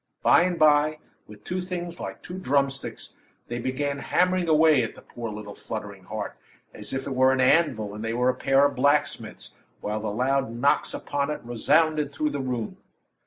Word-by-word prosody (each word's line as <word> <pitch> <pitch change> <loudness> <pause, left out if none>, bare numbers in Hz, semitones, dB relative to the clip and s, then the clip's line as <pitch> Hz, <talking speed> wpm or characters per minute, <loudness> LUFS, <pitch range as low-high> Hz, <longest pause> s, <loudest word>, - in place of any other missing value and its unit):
By - - +6
and 180 0 0
by, 155 0 +4 0.3
with 105 -1 -14
two 185 +1 -3
things 175 -1 -5
like - - -7
two 180 +1 -7
drumsticks, 140 -4 -1 0.3
they 120 0 -4
began 140 +3 -2
hammering 180 +3 +1
away 155 -3 +5
at - - -4
the - - -14
poor, 115 -1 -7
little, 105 -1 -7
fluttering 100 -4 -7
heart, 105 0 -5 0.4
as - - -7
if 135 0 -3
it 135 - -3
were 130 0 +4
an 130 - +1
anvil 130 -7 +3
and 105 +1 -6
they 115 +1 -2
were 125 +1 +2
a - - +3
pair 135 +1 +3
of 140 -1 0
blacksmiths, 145 +3 0 0.3
while 105 +1 -3
the 110 0 -3
loud 130 +4 0
knocks 120 +5 +1
upon 140 0 -2
it 150 - -3
resounded 150 +5 +2
through 150 +1 -1
the 145 - -3
room. 125 -4 -3
135 Hz, 190 wpm, -26 LUFS, 115-155 Hz, 0.4 s, By